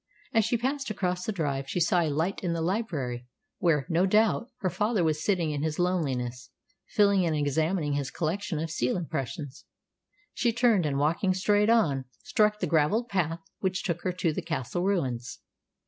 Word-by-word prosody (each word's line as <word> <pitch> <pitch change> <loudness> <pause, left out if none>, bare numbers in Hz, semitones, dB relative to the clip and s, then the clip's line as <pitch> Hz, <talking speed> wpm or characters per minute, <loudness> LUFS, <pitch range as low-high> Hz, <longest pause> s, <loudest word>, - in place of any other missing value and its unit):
As 225 - +4
she 235 +1 +1
passed 270 +3 -2
across 180 -3 -2
the - - -1
drive 140 -7 -2
she 180 - -1
saw 175 +1 +3
a 160 - +1
light 160 +7 -1
in 175 -2 0
the 165 - -2
library, 150 - -2 0.3
where, 150 -6 +2
no 175 +3 +2
doubt, 220 +4 +2
her 190 - +1
father 210 +2 +1
was 155 -1 0
sitting 175 -6 +1
in 145 -1 -2
his 155 0 -1
loneliness, 130 -9 -1 0.4
feeling 200 -2 +4
and 165 -2 +1
examining 150 +2 0
his 140 -2 -1
collection 170 +4 -2
of 160 +1 -3
seal 125 0 0
impressions. 150 -3 -5 0.7
She 235 -2 +1
turned, 225 -8 +3
and, 140 -2 -1
walking 170 +6 +1
straight 205 +3 +3
on, 150 - +3 0.2
struck 210 0 +2
the - - 0
gravelled 175 +10 +2
path 170 -3 -1 0.2
which 185 -1 -1
took 175 -4 -2
her 185 - -1
to 170 -3 0
the - - -3
castle 160 +1 -3
ruins. 130 -11 -1
170 Hz, 180 wpm, -28 LUFS, 150-200 Hz, 0.7 s, As